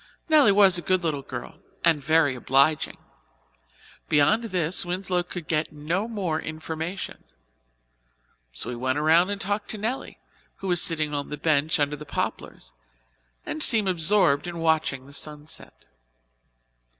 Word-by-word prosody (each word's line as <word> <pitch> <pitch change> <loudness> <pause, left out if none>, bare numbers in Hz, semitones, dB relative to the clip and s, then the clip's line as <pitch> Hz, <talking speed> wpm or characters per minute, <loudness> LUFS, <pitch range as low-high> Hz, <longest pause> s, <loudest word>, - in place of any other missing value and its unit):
Nelly 300 -9 +6
was 195 -3 +5
a - - -6
good 185 0 0
little 150 -4 -1
girl, 120 -2 -8 0.3
and 160 -4 +3
very 155 -2 +3
obliging. 135 +4 +1 1.1
Beyond 205 +11 +3
this 180 -3 0
Winslow 180 0 -1
could 175 -2 -8
get 155 -1 -1
no 165 +8 -2
more 185 -9 -2
information, 160 +4 -6 1.3
so - - -5
he - - -5
went 130 +3 -1
around 160 +5 +4
and 205 0 -3
talked 205 +2 -3
to 215 - -2
Nelly, 225 +6 -4 0.4
who 195 - -7
was 175 -2 +3
sitting 155 -3 +1
on 145 -1 -3
the 150 - -5
bench 155 0 +1
under 145 0 0
the 150 - -10
poplars - - -5 0.7
and 310 - -4
seemed 220 -8 +4
absorbed 175 -3 +2
in 175 -1 -6
watching 160 -5 0
the 140 - -14
sunset. 150 +1 -8
160 Hz, 145 wpm, -25 LUFS, 150-190 Hz, 1.3 s, Nelly